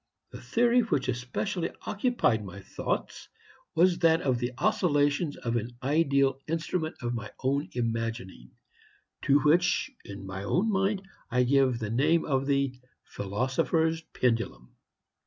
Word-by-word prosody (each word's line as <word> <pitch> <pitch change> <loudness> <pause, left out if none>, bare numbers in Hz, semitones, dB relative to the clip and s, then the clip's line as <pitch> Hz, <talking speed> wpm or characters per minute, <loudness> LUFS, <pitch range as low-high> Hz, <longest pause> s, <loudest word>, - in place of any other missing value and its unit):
The - - -9
theory 240 +1 +3
which 215 - 0
especially 125 - -2 0.2
occupied 205 - +1
my 100 0 -9
thoughts - - -4 0.5
was 175 +1 +4
that 165 0 +4
of 130 -3 +1
the 120 0 -2
oscillations 145 -1 +1
of 115 0 -2
an 120 +2 -5
ideal 140 -2 +2
instrument 160 0 -2
of 120 0 -1
my 110 -3 -5
own 140 +2 0
imagining, 115 - -3 0.8
to 140 +1 +5
which, 175 - +3
in 100 -1 -9
my 95 +1 -6
own 185 - +1
mind, 195 0 +1 0.3
I 125 0 +2
gave 130 -1 +3
the 110 -2 -4
name 155 +8 +2
of 135 -2 0
the 140 -2 +1 0.3
Philosopher's 160 - 0
Pendulum. 115 - -2
140 Hz, 135 wpm, -28 LUFS, 120-165 Hz, 0.8 s, to